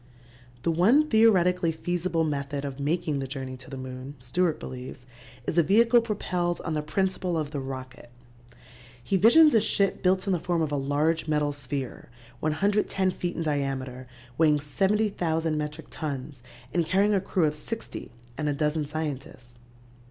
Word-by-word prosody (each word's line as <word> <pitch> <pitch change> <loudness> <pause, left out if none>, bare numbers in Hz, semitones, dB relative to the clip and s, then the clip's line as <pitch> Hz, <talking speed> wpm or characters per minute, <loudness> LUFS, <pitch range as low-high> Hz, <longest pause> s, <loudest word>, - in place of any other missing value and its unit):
The 170 - +2
one 225 - +4
theoretically 180 - +4
feasible 170 +1 -1
method 140 -2 -2
of 140 -1 -6
making 150 0 0
the 135 - -3
journey 130 -1 -5
to 125 0 -13
the 135 - -6
moon, 130 +2 -7
Stewart 155 +7 0
believes, 125 -1 -8 0.4
is 170 - +1
a - - +8
vehicle 230 +8 +5
propelled 180 -6 -2
on 160 - -1
the 150 - 0
principle 185 +2 -1
of 150 -2 -2
the 145 - -3
rocket. 130 -2 -7 0.9
He 195 - 0
visions 290 - +7
a 225 - +5
ship 200 -1 +2
built 185 +1 +2
in 195 - +1
the 175 - +1
form 170 -1 0
of 150 - -2
a - - 0
large 145 +4 0
metal 150 -1 +1
sphere 140 -2 -5 0.3
110 190 +4 +1
feet 175 -1 -4
in 165 - -2
diameter, 135 -4 -2 0.3
weighing 150 -2 +4
70,000 170 -1 0
metric 150 +1 -4
tons 140 -3 -5 0.3
and 175 - +2
carrying 200 +4 +3
a 195 - +2
crew 185 -3 +1
of 150 - +1
sixty 220 +9 -7 0.3
and 150 -1 0
a - - +1
dozen 150 +1 0
scientists. 140 -5 -5
155 Hz, 165 wpm, -27 LUFS, 140-185 Hz, 0.9 s, a